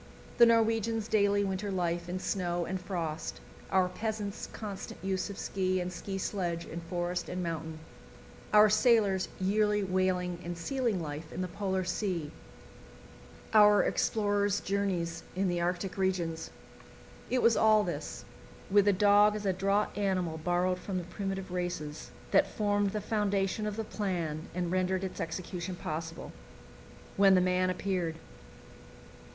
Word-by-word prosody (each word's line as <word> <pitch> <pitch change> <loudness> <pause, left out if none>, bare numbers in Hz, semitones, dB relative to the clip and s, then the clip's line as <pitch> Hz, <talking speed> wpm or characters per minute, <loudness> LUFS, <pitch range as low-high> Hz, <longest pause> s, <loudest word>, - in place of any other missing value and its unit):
The 235 - +9
Norwegians' 225 -1 +2
daily 205 -2 +3
winter 195 +1 -2
life 175 -2 -1
in 180 - -2
snow 175 -2 -1
and 185 +2 -3
frost, 170 -4 -4 0.3
our 190 -1 +3
peasants' 210 +1 -4
constant 205 -3 -7
use 190 +1 -1
of 200 - -7
ski 185 -1 -1
and 180 0 -3
ski 195 +2 -5
sledge 175 -3 -2
in 170 - -6
forest 175 +1 -3
and 180 0 -3
mountain, 160 -1 -4 0.7
our 210 0 +8
sailors' 210 -3 +3
yearly 210 +2 +2
whaling 185 -2 0
and 175 0 -5
sealing 235 +2 -1
life 155 0 -6
in 180 - -4
the 185 - -1
Polar 190 0 -2
Sea, 180 -4 -2 1.2
our 210 -1 +7
explorers' 205 -2 +1
journeys 180 -4 -1
in 190 +1 +1
the 175 -1 0
Arctic 180 +2 -2
regions 175 -4 -1 0.8
it 255 0 +1
was 230 -1 +5
all 215 -1 +5
this, - - -5 0.5
with 205 0 +5
the 205 - +5
dog 205 +2 +5
as 210 -1 -4
a 190 - +2
draught 195 +3 +1
animal 185 -5 -1
borrowed 180 +2 +1
from 190 -1 -4
the 180 - -2
primitive 195 +1 -4
races, 175 -4 -4 0.2
that - - +5
formed 205 -1 +1
the 210 - -2
foundation 205 0 0
of 210 - -3
the 225 - -2
plan 170 -8 -3
and 175 -1 -1
rendered 185 0 0
its 190 - -4
execution 180 +2 -4
possible 165 0 -5 0.9
when 195 -1 +6
the - - +6
man 185 0 +2
appeared. 180 -3 -1
190 Hz, 145 wpm, -31 LUFS, 175-205 Hz, 1.2 s, The